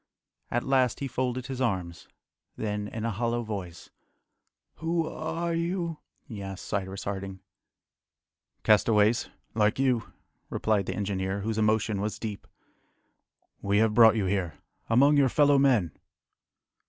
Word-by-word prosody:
At 120 - 0
last 130 -3 +2
he 140 - -2
folded 125 0 -2
his 130 -1 -5
arms, 90 -8 -2 0.5
then, 105 -1 -3
in 110 +1 -5
a 115 - 0
hollow 120 +3 -1
voice, 95 -6 -7 0.9
"Who 165 +1 0
are 165 +2 -3
you?" 170 -1 -2 0.2
he 110 -7 -8
asked 95 -1 -7
Cyrus 95 0 -3
Harding. 95 -1 -5 1.2
"Castaways, 105 +1 +3 0.2
like 105 -1 +2
you," 130 -4 +1 0.4
replied 105 -3 0
the - - -2
engineer, 100 -1 -2
whose 110 +1 -2
emotion 110 -1 +1
was 105 +1 -2
deep. 105 -3 -6 1.1
"We 100 0 +1
have 110 0 +3
brought 115 -1 +7
you 105 -3 0
here, 90 -5 -1 0.3
among 140 +6 +5
your 135 -2 +4
fellow 145 +1 +4
men." 120 - +3
110 Hz, 130 wpm, -28 LUFS, 100-130 Hz, 1.2 s, brought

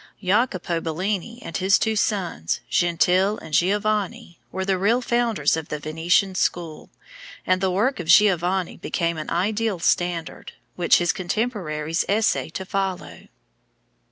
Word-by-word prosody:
Jacopo 185 -4 0
Bellini 190 +8 -3
and - - -4
his 195 +2 +3
two 220 -1 0
sons, 185 - -1
Gentile 180 +4 +2
and 160 - -11
Giovanni, 200 0 0
were 190 0 -3
the 190 -1 0
real 220 +6 +3
founders 235 - +1
of 160 -2 -6
the 150 - -3
Venetian 165 +6 +1
school, 170 -3 -2 0.6
and 185 0 +1
the 190 - +2
work 210 +8 0
of 170 - -5
Giovanni 180 0 +3
became 170 -2 -2
an 155 - -6
ideal 205 +3 0
standard, 170 0 -1 0.2
which 175 -1 +4
his 175 +3 +1
contemporaries 175 -6 -2
essayed 205 -5 0
to 190 - -4
follow. 190 -1 -4
185 Hz, 135 wpm, -23 LUFS, 170-210 Hz, 0.6 s, which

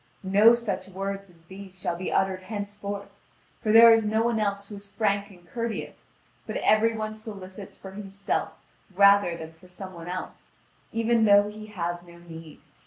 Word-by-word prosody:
No 205 +5 +6
such 195 -6 -3
words 195 +1 -5
as 170 -2 -22
these 190 +1 -11
shall 175 - -2
be 180 +2 -4
uttered 190 -1 +1
henceforth, 205 0 -6 0.5
for 215 - 0
there 230 +1 +9
is 225 0 +5
no 220 +1 +1
one 235 -1 +1
else 200 -1 -1
who 210 - -10
is 200 0 -9
frank 200 -1 0
and 175 -3 -17
courteous; 230 +2 -6 0.3
but - - -3
every 220 +1 +3
one 215 0 -3
solicits 200 -3 -9
for 190 - -10
himself 195 0 -3 0.4
rather 200 -3 +5
than 160 0 -9
for 165 +3 -19
some 185 +1 -9
one 170 -1 -10
else, 185 +1 -7 0.4
even 230 0 +2
though 205 0 +5
he 215 0 -10
have 175 -4 -4
no 170 -1 -15
need." 165 -2 -12
200 Hz, 175 wpm, -26 LUFS, 185-215 Hz, 0.5 s, there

